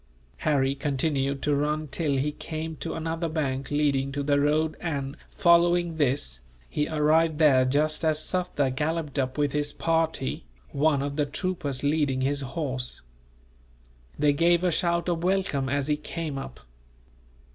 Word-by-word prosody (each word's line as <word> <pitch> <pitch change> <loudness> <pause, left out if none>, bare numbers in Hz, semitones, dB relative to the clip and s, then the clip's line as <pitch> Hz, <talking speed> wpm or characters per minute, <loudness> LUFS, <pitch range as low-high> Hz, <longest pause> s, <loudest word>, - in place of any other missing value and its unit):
Harry 135 -3 +1
continued 140 0 -1
to 145 - +2
run 150 +2 0
till 145 -1 0
he 145 +3 0
came 160 +1 -5
to - - -4
another 165 +1 -2
bank 135 -4 -2
leading 140 -2 +1
to 140 +1 -3
the 145 0 +2
road 155 +2 +1
and, 140 -4 -3
following 170 -1 +3
this, 130 - 0 0.3
he 150 - -1
arrived 155 +1 +2
there 140 -5 +5
just 150 +4 +1
as 155 -1 +3
Sufder 165 -5 0
galloped 150 0 -2
up 130 0 -1
with 145 -1 +1
his 145 0 -1
party, 165 - -1 0.3
one 145 -1 +2
of 140 0 -4
the 150 - +2
troopers 155 -4 -3
leading 145 -3 +1
his 140 +2 0
horse. 135 -3 -4 1.2
They 145 -1 +3
gave 170 +3 +3
a 180 - +2
shout 170 +1 +1
of 170 -1 -1
welcome, 180 -8 +1
as 140 0 0
he 150 -1 +1
came 150 -2 -5
up. 65 - -9
150 Hz, 155 wpm, -26 LUFS, 140-160 Hz, 1.2 s, there